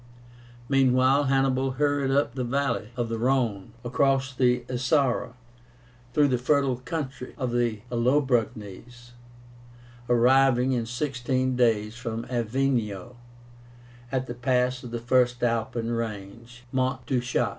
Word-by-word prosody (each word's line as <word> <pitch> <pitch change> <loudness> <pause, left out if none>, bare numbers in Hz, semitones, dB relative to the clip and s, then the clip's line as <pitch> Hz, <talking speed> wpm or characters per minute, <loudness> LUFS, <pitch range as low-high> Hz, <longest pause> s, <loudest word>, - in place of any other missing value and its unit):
Meanwhile 135 +1 +3
Hannibal 135 -1 +1
hurried 145 0 +1
up 135 -3 +1
the 130 -1 -3
valley 130 -3 -1
of 120 -1 -1
the 115 0 -3
Rhone, 120 -6 0
across 135 +1 +1
the 125 -1 +2
Isara, 125 -1 0 0.8
through 145 +2 +3
the 125 -2 +1
fertile 135 -1 +1
country 130 -1 -6
of 130 -3 -2
the 120 -3 0
Allobroges, 120 -2 -1 1.0
arriving, 125 +1 +4
in 120 -3 -1
sixteen 130 0 -1
days 115 -3 +1
from 115 -1 -5
Avenio, 120 -3 -1 1.0
at 130 -1 -1
the 120 - -6
pass 125 +1 0
of 125 - -7
the 120 - -4
first 125 0 +1
Alpine 115 0 -1
range 115 +1 -6
(Mont 130 -1 -1
du 125 0 0
Chat). 120 -1 0
125 Hz, 125 wpm, -26 LUFS, 120-130 Hz, 1.0 s, arriving